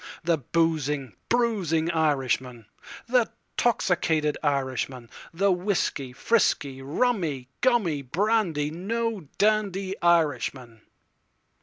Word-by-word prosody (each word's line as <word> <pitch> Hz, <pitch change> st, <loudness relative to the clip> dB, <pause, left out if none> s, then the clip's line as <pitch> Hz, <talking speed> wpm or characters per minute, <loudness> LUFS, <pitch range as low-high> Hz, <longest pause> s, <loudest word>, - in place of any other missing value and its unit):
The 165 Hz, -2 st, +1 dB
boozing, 150 Hz, -4 st, 0 dB, 0.2 s
bruising 190 Hz, -9 st, +1 dB
Irishman, 130 Hz, -7 st, 0 dB, 0.4 s
The 245 Hz, -1 st, +2 dB, 0.3 s
'toxicated 160 Hz, -9 st, +1 dB
Irishman—The 135 Hz, +5 st, -2 dB
whiskey, 175 Hz, -8 st, -1 dB
frisky, 135 Hz, -, +1 dB
rummy, 150 Hz, -, -1 dB
gummy, 210 Hz, -, +2 dB
brandy, 165 Hz, -, 0 dB
no 210 Hz, +1 st, -3 dB
dandy 200 Hz, -2 st, +1 dB
Irishman. 135 Hz, -8 st, +1 dB
165 Hz, 75 wpm, -26 LUFS, 140-200 Hz, 0.4 s, The